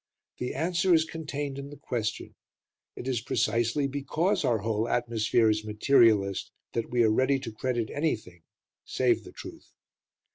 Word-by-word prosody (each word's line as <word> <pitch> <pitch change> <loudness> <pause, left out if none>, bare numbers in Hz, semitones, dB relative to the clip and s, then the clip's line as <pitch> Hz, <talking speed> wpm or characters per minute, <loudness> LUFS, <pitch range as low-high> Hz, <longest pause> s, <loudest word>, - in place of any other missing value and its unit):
The 125 - -3
answer 170 +4 +2
is 160 0 +3
contained 145 -4 -5
in 140 0 -7
the 145 - -11
question: 115 -4 -3 0.6
it 125 - -7
is 125 -4 0
precisely 120 +4 0
because 145 +7 0
our 120 - +2
whole 110 +2 -1
atmosphere 115 -1 +2
is 110 0 +1
materialist 105 -3 +3 0.2
that 115 -1 -2
we 120 -1 +3
are 110 - +4
ready 130 +5 +3
to 125 -4 -6
credit 120 0 -2
anything 110 - -2 0.4
save - - +1
the - - -11
truth. - - -11
120 Hz, 150 wpm, -28 LUFS, 110-140 Hz, 0.6 s, are